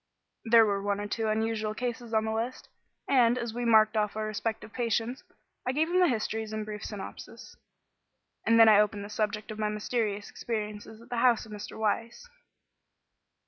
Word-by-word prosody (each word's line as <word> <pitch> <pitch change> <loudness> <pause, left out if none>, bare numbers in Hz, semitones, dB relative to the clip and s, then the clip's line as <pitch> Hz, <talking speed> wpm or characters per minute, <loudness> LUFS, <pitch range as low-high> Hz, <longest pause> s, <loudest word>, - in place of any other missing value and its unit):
There 225 0 +7
were 200 -2 0
one 200 0 -1
or 205 - -3
two 220 +1 -2
unusual 215 0 -1
cases 240 -1 -4
on 220 -1 +2
the 220 - -1
list, 230 +3 -3 0.4
and, 245 -3 +4
as 235 -2 -3
we 240 +1 -3
marked 220 -1 +5
off 210 -1 0
our 215 0 -2
respective 215 0 -4
patients, 235 +1 -1 0.4
I 255 - -1
gave 315 +4 +1
him 365 - +3
the 360 - +5
histories 220 -3 -2
in 215 0 -2
brief 210 0 -7
synopsis. 205 -3 -8 0.9
And 230 +1 +4
then 225 - +9
I 210 -2 +7
opened 205 -1 +1
the 205 - -10
subject 210 0 -2
of 215 - -7
my 210 -1 0
mysterious 210 -1 -2
experiences 215 -1 -5
at - - -18
the 245 - -2
house 235 -2 +3
of 220 - -14
Mr. 210 +1 -8
Weiss. 230 - -2
220 Hz, 185 wpm, -29 LUFS, 210-235 Hz, 0.9 s, then